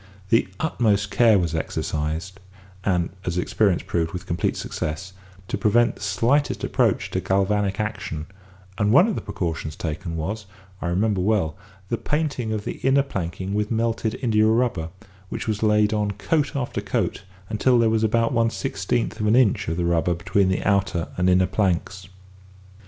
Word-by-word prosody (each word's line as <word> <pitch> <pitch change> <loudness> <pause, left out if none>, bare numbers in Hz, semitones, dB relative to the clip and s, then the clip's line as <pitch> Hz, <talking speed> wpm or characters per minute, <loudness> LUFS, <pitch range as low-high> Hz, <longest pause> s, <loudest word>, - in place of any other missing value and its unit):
The 115 - +3
utmost 105 -9 +1
care 115 -3 +5
was 85 -3 0
exercised 80 +3 -3 0.4
(and, 90 -4 +1
as 90 0 -2
experience 95 0 +1
proved, 80 -1 -1
with 90 - -5
complete 85 - -1
success) 85 +5 -4 0.3
to - - -3
prevent 120 +2 +3
the - - -16
slightest 115 +9 +1
approach - - +1
to - - 0
galvanic 100 +1 +1
action, 95 -8 -3 0.5
and 105 -1 +2
one 175 - +7
of 225 - 0
the - - -3
precautions 80 -3 -4
taken 80 +1 -4
was, 100 +6 -4 0.3
I - - -2
remember 95 +2 +1
well, 95 -6 +1 0.3
the 115 - -1
painting 145 -7 -1
of 105 -1 -3
the - - -4
inner 135 +1 +3
planking 95 -5 -4
with 105 0 0
melted 115 0 0
india 110 -3 +3
rubber, 110 -8 +1 0.4
which - - -5
was 105 -2 -1
laid 105 -1 +3
on 105 -1 0
coat 145 +9 0
after 130 -3 -2
coat - - -1 0.3
until 120 +4 +2
there 115 -1 +4
was 110 0 +1
about 115 +2 +2
one 115 -1 +3
sixteenth 115 -1 -2
of 105 - 0
an 110 - +4
inch 125 -6 +3
of 80 +1 -2
the 90 - 0
rubber 85 0 +1
between 95 +3 +1
the 95 - 0
outer 95 -4 +1
and 90 +1 +2
inner 90 0 +4
planks. 95 -1 -1
105 Hz, 170 wpm, -23 LUFS, 90-115 Hz, 0.5 s, one